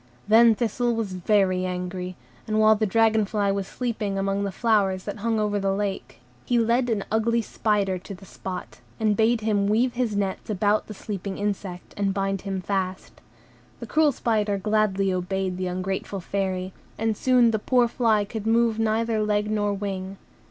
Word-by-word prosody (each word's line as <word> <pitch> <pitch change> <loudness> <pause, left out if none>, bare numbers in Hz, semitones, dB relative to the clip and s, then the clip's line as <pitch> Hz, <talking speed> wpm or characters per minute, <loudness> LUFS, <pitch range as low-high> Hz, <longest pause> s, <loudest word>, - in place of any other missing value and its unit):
Then 225 +1 +6
Thistle 240 +1 0
was 220 -4 -3
very 185 0 +2
angry, 180 0 -4 0.3
and 215 0 +1
while 215 0 +6
the 215 0 0
dragon 220 +1 +3
fly 205 -1 0
was 195 -1 -2
sleeping 215 -5 -3
among 195 +1 0
the 200 - -2
flowers 195 -3 +1
that 205 - -5
hung 225 +1 0
over 205 -1 0
the 195 0 0
lake, 200 -1 -4 0.2
he 245 - +1
led 235 +2 +2
an 210 -4 -1
ugly 230 +1 +1
spider 200 -4 0
to 195 +2 -9
the 190 +2 -14
spot, 180 - -7 0.2
and 215 -1 +2
bade 225 +2 +2
him 205 -2 +1
weave 235 +4 +2
his 235 -4 -1
nets 200 0 -2
about 210 +1 +1
the 215 - -8
sleeping 200 -1 -5
insect, 200 -3 -4
and 195 -1 0
bind 195 -1 -1
him 195 -2 -3
fast. 190 -1 -3 0.6
The - - -6
cruel 310 -1 +3
spider 215 -5 0
gladly 200 -2 +1
obeyed 185 0 -2
the 185 0 -2
ungrateful 190 +2 -3
Fairy; 190 0 -3 0.2
and 225 0 0
soon 250 0 +4
the 220 - 0
poor 245 +2 +3
fly 225 -3 +2
could 215 +1 -5
move 230 -1 +2
neither 225 0 +1
leg 210 0 0
nor 205 -1 +1
wing. 195 -1 -4
205 Hz, 180 wpm, -25 LUFS, 195-220 Hz, 0.6 s, Then